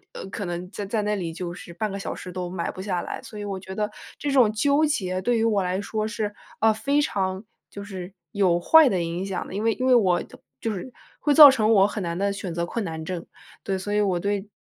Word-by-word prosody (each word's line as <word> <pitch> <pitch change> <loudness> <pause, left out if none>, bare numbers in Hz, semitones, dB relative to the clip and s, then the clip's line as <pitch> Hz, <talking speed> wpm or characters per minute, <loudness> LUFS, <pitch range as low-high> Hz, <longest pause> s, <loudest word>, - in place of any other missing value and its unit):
呃， - - -6
可 200 +2 -5
能 175 +1 -5
在 205 - -5
在 215 +2 -1
那 210 0 0
里 170 -4 -4
就 175 0 -5
是 180 -1 -10
半 210 +5 -3
个 195 - -4
小 195 - -4
时 185 - -8
都 180 -1 -4
买 175 -2 -3
不 - - -9
下 180 -3 -2
来。 - - -5
所 210 - -10
以 205 - -5
我 200 -2 -4
觉 190 0 -8
得 210 0 -1 0.3
这 290 - -2
种 250 -6 +4
纠 280 +7 +2
结 185 -11 -1
对 240 +2 +2
于 225 - +1
我 210 -3 +2
来 185 +1 -1
说 215 +1 -2
是， 215 -2 -3 0.3
呃， 220 0 +5
非 280 +7 +1
常 190 -8 -1 0.3
就 200 - -8
是 190 -2 -7 0.2
有 180 -4 +2
坏 320 - +7
的 185 -6 0
影 170 +2 -3
响 190 -2 -3
的。 - - -9
因 205 - -2
为 225 - +3
因 255 - -2
为 260 - +6
我 190 -7 +3 0.4
就 225 - -1
是 210 +6 -6 0.3
会 295 -1 +2
造 295 -1 +12
成 220 -4 +2
我 195 -2 +6
很 205 0 -4
难 170 -1 -3
的 200 +2 0
选 195 -3 -5
择 170 0 -1
困 225 +3 -3
难 160 -2 -5
症。 175 -1 -4 0.4
对， 190 -1 -1
所 205 +2 -4
以 210 - +2
我 185 -4 +1
对 200 +1 -2
200 Hz, 280 characters per minute, -25 LUFS, 180-220 Hz, 0.4 s, 造